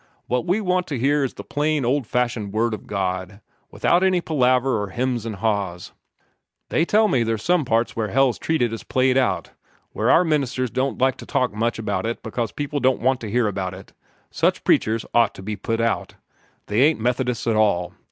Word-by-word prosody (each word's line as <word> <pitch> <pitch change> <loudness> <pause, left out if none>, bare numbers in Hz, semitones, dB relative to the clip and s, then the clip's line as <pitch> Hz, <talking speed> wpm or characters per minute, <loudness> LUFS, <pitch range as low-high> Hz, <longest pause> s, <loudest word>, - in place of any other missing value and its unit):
What 125 +7 -1
we 190 +5 +1
want 180 -2 0
to 145 - -3
hear 140 +4 +2
is 135 - -3
the - - -8
plain, 150 -2 -1
old 130 0 0
fashioned 120 -5 -1
Word 115 +1 +1
of 110 - -7
God, 95 0 -3 0.3
without 175 - +2
any 190 -1 +3
palaver 130 -7 +1
or 100 - -3
'hems 120 +1 -2
and 110 - -4
ha's. 100 -4 -2 0.8
They 165 - +2
tell 215 +4 +3
me 130 - +2
there's 115 -2 -1
some 175 -1 +2
parts 115 -1 0
where 110 -2 -1
hell's 130 +3 +2
treated 125 -8 0
as 115 - -5
played 130 0 +1
out 130 -2 0 0.4
where - - 0
our 175 - +6
ministers 135 -6 0
don't 135 +1 -1
like 130 0 +2
to - - -11
talk 125 -4 0
much 115 +3 -1
about 110 0 -2
it 115 - -4
because 115 -3 -3
people 145 0 -3
don't 130 -1 +2
want 130 +1 +1
to 110 - -5
hear 120 +1 +1
about 95 -2 -3
it. 95 +1 -13 0.4
Such - - +1
preachers 110 +1 +2
ought 115 -3 +3
to 95 - -10
be 105 +2 -3
put 115 +2 -3
out. 115 0 -1 0.5
They 105 +4 +1
ain't 150 0 +4
Methodists 125 +1 -1
at 115 -2 +1
all. 100 -5 +1
120 Hz, 205 wpm, -22 LUFS, 110-135 Hz, 0.8 s, our